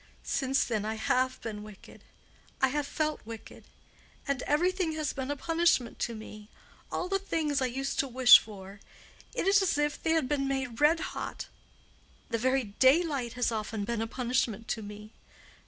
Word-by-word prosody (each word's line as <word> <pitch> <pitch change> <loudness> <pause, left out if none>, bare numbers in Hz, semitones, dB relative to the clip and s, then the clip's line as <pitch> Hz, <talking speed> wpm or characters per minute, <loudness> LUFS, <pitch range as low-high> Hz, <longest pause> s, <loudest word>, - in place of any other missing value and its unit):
Since 270 0 +1
then 220 -4 -1
I 220 +1 -2
have 255 +3 0
been 215 -2 -5
wicked. 210 -2 -13 0.6
I 265 - +3
have 290 +1 -2
felt 310 0 -2
wicked. 225 0 -10 0.6
And 280 -2 -1
everything 350 +2 +1
has 310 -2 -2
been 265 0 -4
a 290 - -1
punishment 330 -5 +1
to 235 - -2
me—all 215 +10 -8
the 390 +1 0
things 310 -7 -1
I 260 - +2
used 270 +2 -3
to 275 - +2
wish 255 -1 +8
for—it 200 - -9
is 400 +1 +5
as 365 -6 +1
if 295 0 0
they 320 - +1
had 320 -5 +1
been 275 -1 0
made 265 -3 -3
red 320 +3 +5
hot. - - -5 0.8
The 230 - -1
very 260 +2 +2
daylight 260 - +2
has 245 -1 0
often 215 -1 -3
been 235 0 -2
a 225 - -1
punishment 235 -2 -1
to 220 - -2
me. 210 +1 -10
260 Hz, 170 wpm, -29 LUFS, 225-295 Hz, 0.8 s, wish